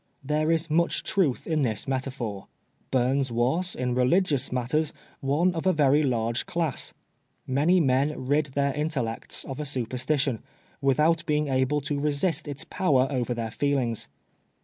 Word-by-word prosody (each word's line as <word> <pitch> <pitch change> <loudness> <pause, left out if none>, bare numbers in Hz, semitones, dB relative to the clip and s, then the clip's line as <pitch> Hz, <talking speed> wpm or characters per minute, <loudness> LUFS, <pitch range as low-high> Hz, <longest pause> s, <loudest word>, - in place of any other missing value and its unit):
There 155 +3 +1
is 165 0 +1
much 170 +2 +1
truth 165 -11 0
in 155 -2 0
this 110 -6 -1
metaphor. 130 -7 -3 0.4
Bums 130 +1 +1
was, 135 +11 0
in 125 -1 -1
religious 140 +3 +2
matters, 130 +5 0 0.3
one 150 +7 +1
of 165 +2 -2
a 185 - +4
verv 145 0 +4
large 115 -1 -1
class. 165 -6 -2 0.5
Many 150 +8 +3
men 135 -1 +1
rid 145 +3 +2
their 140 -1 +1
intellects 140 -6 -1
of 135 -1 -7
a - - -2
superstition, 130 0 -1 0.4
without 155 +5 +3
being 150 -1 +1
able 130 +2 +1
to 145 +1 -2
resist 150 +2 0
its 140 -1 -5
power 135 -8 +2
over 125 -2 -1
their 115 -1 -3
feelmgs. 130 -4 0
140 Hz, 150 wpm, -26 LUFS, 125-155 Hz, 0.5 s, a